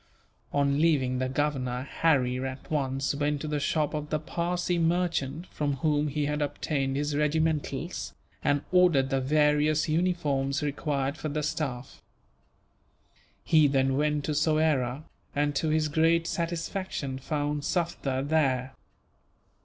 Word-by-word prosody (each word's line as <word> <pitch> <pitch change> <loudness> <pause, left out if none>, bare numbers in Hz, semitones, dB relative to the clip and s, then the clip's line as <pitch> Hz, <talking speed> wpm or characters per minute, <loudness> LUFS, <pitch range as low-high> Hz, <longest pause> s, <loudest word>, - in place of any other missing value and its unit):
On 140 0 +2
leaving 135 -6 +2
the 130 0 -1
Governor, 130 -3 -1
Harry 130 -4 +1
at 130 +2 -6
once 135 -2 0
went 145 0 0
to 155 - -4
the 150 -1 -1
shop 150 +1 0
of 150 -1 -4
the 155 - 0
Parsee 175 +2 -1
merchant 165 -3 0
from 145 -2 -1
whom 150 +2 +1
he 145 0 -1
had 150 +1 -1
obtained 140 -2 -1
his 145 +1 -1
regimentals, 155 +1 -1 0.3
and 145 0 +1
ordered 170 -7 +4
the 135 0 +1
various 150 +2 +2
uniforms 155 -5 0
required 140 -1 -1
for 155 - -4
the 150 +1 -2
staff. 135 -4 -4 1.4
He 155 -3 +5
then 135 -1 +2
went 150 0 +1
to 155 - -1
Soyera 150 -3 +1 0.3
and, 145 0 +1
to 160 - 0
his 155 0 +2
great 165 +2 +2
satisfaction, 170 -5 -3
found 145 +1 -2
Sufder 145 -7 -1
there. 135 -4 +1
150 Hz, 135 wpm, -28 LUFS, 135-155 Hz, 1.4 s, He